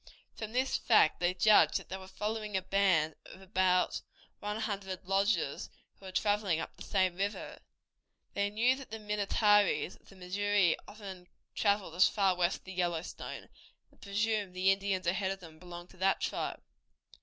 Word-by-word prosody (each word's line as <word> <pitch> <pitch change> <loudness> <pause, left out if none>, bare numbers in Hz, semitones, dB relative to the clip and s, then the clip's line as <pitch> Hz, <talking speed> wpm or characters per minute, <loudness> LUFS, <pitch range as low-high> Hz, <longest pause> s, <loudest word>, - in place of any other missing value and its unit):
From 220 -1 -6
this 260 +2 +1
fact 215 -9 +4
they 175 +1 +1
judged 180 -5 +5
that - - -10
they 190 - -4
were 190 0 -11
following 210 0 -3
a 190 - -3
band 185 -5 +2
of - - -12
about 185 -1 +1 0.4
one 210 +1 -3
hundred 195 -4 -4
lodges, 195 -6 0 0.3
who 195 - -14
were - - -7
traveling 205 -3 +1
up - - -6
the - - -20
same 185 -3 +1
river. 200 +2 -3 0.7
They 200 0 0
knew 235 +5 +2
that 270 - -10
the 220 - -5
Minnetarees 210 -1 +2
of - - -24
the 195 - -15
Missouri 195 0 +1
often 195 -4 -10 0.3
traveled 200 -5 +1
as 180 +2 +5
far 195 -3 +2
west 175 +1 0
as - - -35
the 190 - -9
Yellowstone, 175 -2 -3 0.4
and - - -27
presumed 210 +1 0
that 180 - -20
the 185 +1 +3
Indians 195 -1 -1
ahead 190 +2 0
of 195 0 -4
them 160 -3 -13
belonged 175 0 -10
to - - -18
that 190 +1 +2
tribe. - - -3
195 Hz, 180 wpm, -32 LUFS, 180-205 Hz, 0.7 s, judged